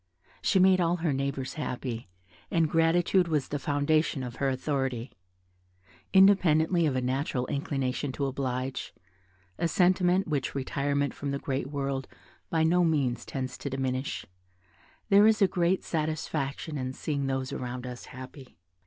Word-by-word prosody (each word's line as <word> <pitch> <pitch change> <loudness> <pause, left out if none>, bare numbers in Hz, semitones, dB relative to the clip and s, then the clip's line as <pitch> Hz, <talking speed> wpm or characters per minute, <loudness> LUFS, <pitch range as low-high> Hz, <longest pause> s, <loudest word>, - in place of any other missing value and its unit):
She - - +2
made 185 0 +5
all 170 0 +2
her 165 -4 0
neighbours 135 -1 -2
happy, 125 -7 -4 0.4
and 165 -1 +2
gratitude 170 +3 +3
was 150 -5 0
the 145 - -2
foundation 145 0 +1
of 125 -1 -6
her 140 - +1
authority. 130 -2 -2 1.0
Independently 180 -4 +5
of 135 - 0
a 130 - +1
natural 130 0 -1
inclination 135 0 -2
to 140 - -1
oblige, 130 -1 -3 0.6
a 170 - +2
sentiment 180 +1 +3
which 145 -4 -2
retirement 140 +1 -1
from 145 - -5
the 140 - -1
great 135 -1 -3
world 135 -2 -3 0.4
by 160 -1 +2
no 175 +2 +4
means 140 -7 +1
tends 130 -2 -4
to 140 - -4
diminish, 130 0 -2 0.8
there 200 +1 +7
is 220 -1 +4
a 195 - +5
great 180 +1 +1
satisfaction 155 -2 -2
in 130 0 -3
seeing 140 -1 -2
those 135 -1 -2
around 125 0 -5
us 125 -1 -7
happy. 130 - -11
140 Hz, 145 wpm, -28 LUFS, 130-165 Hz, 1.0 s, there